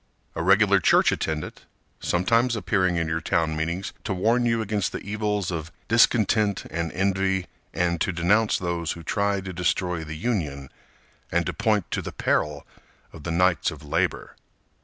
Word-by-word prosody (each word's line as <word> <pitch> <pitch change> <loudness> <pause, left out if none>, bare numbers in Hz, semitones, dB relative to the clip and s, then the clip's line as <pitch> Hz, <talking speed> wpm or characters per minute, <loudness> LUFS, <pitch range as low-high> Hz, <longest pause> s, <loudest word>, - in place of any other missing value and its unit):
A - - -3
regular 100 +2 +5
church - - +4
attendant, 80 -1 -3 0.4
Sometimes 115 +7 +2
appearing 95 -2 +1
in 85 -1 0
your 80 0 -1
town 80 -1 0
meetings 85 +5 -3
to 95 - -2
warn 115 +6 +2
you 115 -1 +1
Against 105 -3 -1
the - - -4
evils 105 -2 -2
of 80 -1 -5 0.2
discontent 110 -3 +3
and 85 -1 -2
envy 95 0 0 0.3
And 85 -2 0
to - - +1
denounce 100 +6 +2
those 85 -3 -2
who 85 - -10
tried 100 +2 0
to 95 - -5
destroy 90 -1 -1
the 75 0 -7
Union, 75 - -2 0.6
And 85 0 +1
to - - -2
point 110 -5 0
to - - -1
the - - -6
peril 75 -1 -1 0.5
of 75 - -11
the 85 - -2
Knights 90 +1 +2
of 75 -1 -10
Labor. 70 - -1
90 Hz, 165 wpm, -25 LUFS, 85-105 Hz, 0.6 s, regular